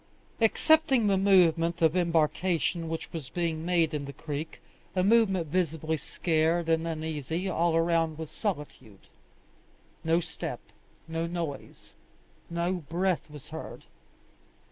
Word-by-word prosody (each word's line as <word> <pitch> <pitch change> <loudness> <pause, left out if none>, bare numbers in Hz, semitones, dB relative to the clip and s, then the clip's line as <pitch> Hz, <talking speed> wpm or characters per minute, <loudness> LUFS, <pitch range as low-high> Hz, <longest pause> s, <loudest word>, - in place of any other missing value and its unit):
Excepting 270 +1 +4
the 200 -1 +3
movement 175 -3 +3
of 160 +1 +4
embarkation 165 -1 +1
which 165 0 -5
was 155 -6 -6
being 165 -1 -2
made 170 -2 +2
in 145 -2 -2
the 140 - -7
creek, 150 +2 -6 0.4
a 185 - +2
movement 195 -4 +4
visibly 160 -1 -1
scared 165 +2 0
and 165 0 +2
uneasy, 160 +2 -3
all 170 -2 +1
around 165 -1 +2
was 160 -2 -6
solitude; 145 - -5 1.0
no 165 +1 +3
step, 175 - -5 0.5
no 165 +1 -2
noise, 165 -5 -6 0.6
no 170 +2 0
breath 175 +1 -1
was 150 -2 -11
heard. - - -8
165 Hz, 120 wpm, -28 LUFS, 160-180 Hz, 1.0 s, Excepting